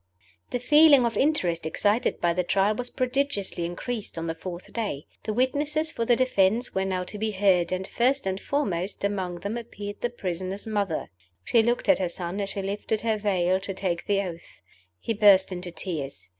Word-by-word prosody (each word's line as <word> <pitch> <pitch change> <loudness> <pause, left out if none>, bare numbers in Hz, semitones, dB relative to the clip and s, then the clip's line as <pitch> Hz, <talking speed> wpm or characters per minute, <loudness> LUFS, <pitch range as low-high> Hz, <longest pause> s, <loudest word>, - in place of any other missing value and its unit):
THE - - -1
feeling 295 0 +6
of 235 - -1
interest 185 - +1
excited 205 +9 +1
by 170 0 +2
the 180 - +1
Trial 195 +4 +2
was 245 +2 -4
prodigiously 255 -9 -1
increased 205 +4 -5
on 165 - -3
the 165 - -2
fourth 175 +2 -8
day. 205 -11 -3 0.2
The 215 - -1
witnesses 290 +6 0
for 230 - -2
the 240 - +4
defense 235 -1 +2
were 190 0 0
now 185 -1 -1
to 205 +3 -6
be 220 +1 0
heard, 185 -4 +2
and 185 +1 -2
first 260 +5 +1
and 190 0 -1
foremost 200 -11 -2
among 185 -4 -2
them 205 +5 -3
appeared 205 -3 -7
the 240 - 0
prisoner's 190 -3 -4
mother. 205 -6 -2 0.3
She 230 - +4
looked 240 +2 0
at 290 - +5
her 185 -2 0
son 175 +3 -4
as 200 - -2
she 195 - -4
lifted 205 +2 -2
her 220 -2 0
veil 185 -3 +1
to 195 0 -5
take 180 -3 -2
the 200 -1 +2
oath. 170 - -9 0.4
He 230 - -2
burst 200 -3 +6
into 180 0 -5
tears. 145 - -5
200 Hz, 195 wpm, -26 LUFS, 180-235 Hz, 0.4 s, feeling